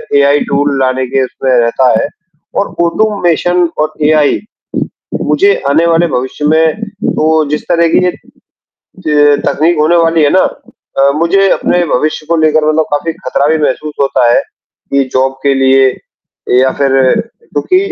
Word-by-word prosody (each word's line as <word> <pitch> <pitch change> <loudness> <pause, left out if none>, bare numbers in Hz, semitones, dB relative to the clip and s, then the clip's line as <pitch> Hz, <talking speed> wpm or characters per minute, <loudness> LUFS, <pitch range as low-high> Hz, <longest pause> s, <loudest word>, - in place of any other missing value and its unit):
AI 140 +1 +4
tool 145 0 0
लाने 130 0 0
के 130 +1 0
उसमें 130 +1 -3
रहता 125 +1 +2
है - - -1 0.5
और 200 - 0 0.2
ऑटोमेशन 175 -2 +1
और 155 0 -1
एआई, 150 -1 +2 0.8
मुझे 400 +1 +2 0.2
आने 160 +4 +2
वाले 170 +1 +2
भविष्य 130 +4 -3
में 160 +5 +1 0.2
तो 155 0 +1
जिस 150 - -2
तरह 170 -1 +3
की - - +3
ये 180 - +1 1.0
त 145 -1 +3
तकनीक 165 +3 +1
होने 155 +3 +3
वाली 165 -1 +2
है 145 - +3
ना 185 - +3 0.6
अ, 140 0 +4
मुझे 190 +5 +2
अपने 175 0 +1
भविष्य 155 +2 -1
को 170 - +2
लेकर 155 0 +2
मतलब 155 0 +1
काफ़ी 160 +3 -2
ख़तरा 140 +1 -2
भी 160 +1 +2
महसूस 150 0 -2
होता 135 -3 +2
है - - +3 0.5
कि 140 0 +2
जॉब 130 +1 +1
के 140 -1 +2
लिए 135 0 +3 0.7
या 130 +1 +3
फिर 140 -1 +1 0.4
क्योंकि 370 - -2
155 Hz, 155 wpm, -11 LUFS, 140-170 Hz, 1.0 s, एआई